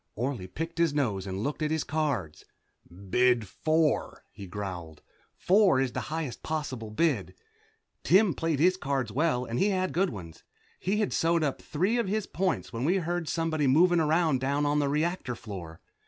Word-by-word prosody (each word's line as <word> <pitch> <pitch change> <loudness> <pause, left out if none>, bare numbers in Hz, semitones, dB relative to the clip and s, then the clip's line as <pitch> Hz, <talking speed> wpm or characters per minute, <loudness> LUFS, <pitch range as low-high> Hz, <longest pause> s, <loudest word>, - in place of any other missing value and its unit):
Orley 120 -5 -3
picked 165 - -5
his 165 -4 +2
nose 105 -9 -1
and 95 +2 -3
looked 145 +4 -3
at 155 - +1
his 160 -1 0
cards, 140 - -2 0.7
"Bid 125 -3 +3
four," 155 +8 0
he 100 - -10
growled. 90 -5 -6 0.3
Four 190 -7 +4
is 130 -2 0
the - - -3
highest 155 -5 -4
possible 135 -8 -4
bid. 110 - 0 0.7
Tim 190 0 +5
played 165 +1 -1
his 185 +4 +4
cards 135 - -2
well 130 -1 +1
and 120 +1 -3
he 205 - +3
had 185 -1 0
good 190 +3 +2
ones. 90 -8 -9 0.4
He 205 +4 0
had 210 - -1
sewed 165 0 +2
up 140 -3 -1
three 190 +10 0
of 230 - 0
his 210 +1 -1
points 180 -10 -2
when 115 +2 -3
we 175 +7 +2
heard 175 -2 -2
somebody 160 -3 0
moving 175 +6 +5
around 155 -3 +2
down 140 +2 0
on 145 +1 +2
the 145 -1 +1
reactor 150 -3 -1
floor. 90 -8 -9
150 Hz, 180 wpm, -28 LUFS, 120-170 Hz, 0.7 s, Tim